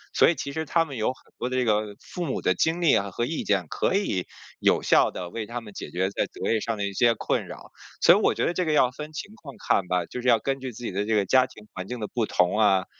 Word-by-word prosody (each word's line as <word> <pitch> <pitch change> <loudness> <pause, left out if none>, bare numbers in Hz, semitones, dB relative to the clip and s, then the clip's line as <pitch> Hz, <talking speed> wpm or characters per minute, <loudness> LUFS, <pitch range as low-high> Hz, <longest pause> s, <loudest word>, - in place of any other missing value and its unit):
所 - - +6
以 170 - +1
其 140 - -5
实 160 - -2
他 165 +3 +2
们 140 -4 -8
有 110 - 0
很 130 - -6
多 125 - -2
的 130 - -2
这 125 - +1
个 105 -1 0
父 180 - -6
母 135 - -2
的 95 - +3
经 160 - 0
历 165 - +5
啊， 100 0 0
和 120 - -2
意 155 +5 -3
见， 95 -4 +1
可 190 - 0
以 100 - 0 0.3
有 - - +3
效 - - +4
地 90 -1 -6
为 110 -2 -5
他 120 +1 -4
们 105 -3 -12
解 - - -7
决 95 +4 -1
在 - - 0
择 - - -3
业 110 - +2
上 115 +1 -3
的 100 - -1
一 100 - -5
些 115 +3 +3
困 - - -1
扰。 - - -11 0.3
所 - - +7
以 - - +3
我 - - +2
觉 - - 0
得 175 - 0
这 180 - 0
个 155 -3 0
要 125 -4 +4
分 150 +4 -8
情 160 +7 -7
况 140 -4 -10
看 95 -2 +2
吧， 90 -1 0
就 125 - -6
是 125 - -3
要 120 -2 +6
根 135 +3 -2
据 130 -1 -5
自 120 +1 -11
己 115 - -3
的 100 +2 -1
这 110 0 +1
个 100 - +2
家 130 +6 +4
庭 105 0 -15
环 95 +1 -6
境 125 - -5
的 105 - -3
不 115 -2 -1
同 90 +4 +2
啊， 95 -3 +4
115 Hz, 330 characters per minute, -25 LUFS, 100-135 Hz, 0.3 s, 所